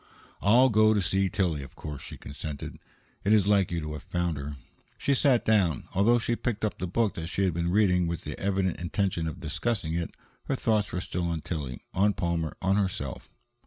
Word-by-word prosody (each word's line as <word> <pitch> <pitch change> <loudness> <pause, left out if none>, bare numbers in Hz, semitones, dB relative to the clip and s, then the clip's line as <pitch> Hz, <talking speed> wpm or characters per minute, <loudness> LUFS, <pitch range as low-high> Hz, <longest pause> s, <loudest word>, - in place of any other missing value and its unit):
"I'll 120 +6 +6
go 110 -1 +5
to - - +3
see 95 0 +1
Tillie, 85 -6 0
of 70 - -11
course," 75 -3 -7
she - - -8
consented. 70 0 -7 0.4
"It 105 - +3
is 105 -3 +5
like 100 -2 +3
you 85 - -1
to 75 0 -4
have 75 - -6
found 85 -2 -1
her." 70 +1 -5 0.4
She 140 - +1
sat 130 -2 +3
down. 95 - +3
Although 110 +6 +4
she 120 0 0
picked 115 -3 -2
up 105 - -3
the 90 - -2
book 110 +3 +1
that 80 -1 -5
she 95 +3 -1
had 95 -3 +2
been 85 +1 -1
reading 90 -3 +3
with 85 0 -3
the 75 -1 -5
evident 95 -2 0
intention 85 -1 -1
of 80 - -5
discussing 85 +2 -2
it, 85 0 -3 0.3
her - - 0
thoughts 110 -5 +1
were 90 - -2
still 90 -1 -2
on 85 -2 -2
Tillie, 70 -8 -5
on 100 +2 +3
Palmer, 85 -3 -1
on 95 +2 +3
herself. 95 -3 -2
90 Hz, 210 wpm, -28 LUFS, 80-105 Hz, 0.4 s, I'll